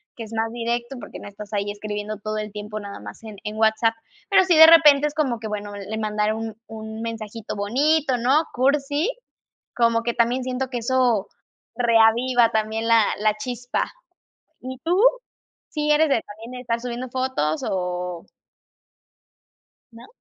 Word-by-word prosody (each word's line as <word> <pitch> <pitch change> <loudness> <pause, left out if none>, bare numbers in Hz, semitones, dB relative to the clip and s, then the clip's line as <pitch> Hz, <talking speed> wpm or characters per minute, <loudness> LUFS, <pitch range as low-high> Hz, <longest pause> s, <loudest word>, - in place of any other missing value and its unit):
que 230 - -7
es 220 0 -10
más 225 0 -1
directo 240 +2 -3
porque - - -9
no - - -10
estás 205 +1 -10
ahí 205 0 -1
escribiendo 210 0 -5
todo 215 +1 -4
el 215 0 -4
tiempo 210 +1 -6
nada 200 -1 -8
más - - -11
en 215 -2 -9
en 210 +1 -5
WhatsApp, 220 +1 +2 0.3
pero 390 -2 +5
sí, 355 -2 +3
de 320 0 +11
repente 300 -3 +7
es 295 - -7
como 265 -7 0
que: 220 - -5
"Bueno, 205 -1 -5
le 205 +2 -6
mandaré 210 0 0
un 225 -1 -5
un 220 0 -8
mensajito 225 -1 -6
bonito", 265 +7 +1
¿no?, 265 +6 +3
cursi. 285 - +1 0.7
Como 230 -1 +3
que 235 0 -1
también 240 +3 +1
siento 255 +1 -3
que 245 -2 -3
eso 240 -3 +1 0.5
reaviva 235 +1 +4
también 220 +1 -1
la 230 -1 +5 0.2
la 215 0 +2
chispa, 245 +1 -3 0.8
¿y 260 0 -7
tú? 355 +2 +2 0.7
¿sí 300 -2 -2
eres 305 +1 +4
de 235 -6 +2
también 225 +4 -11
de 250 - -7
estar 230 -1 -2
subiendo 245 +1 -5
fotos 250 - -1
o? 180 -2 -3 1.7
¿No? 230 +1 -13
230 Hz, 165 wpm, -23 LUFS, 215-255 Hz, 1.7 s, de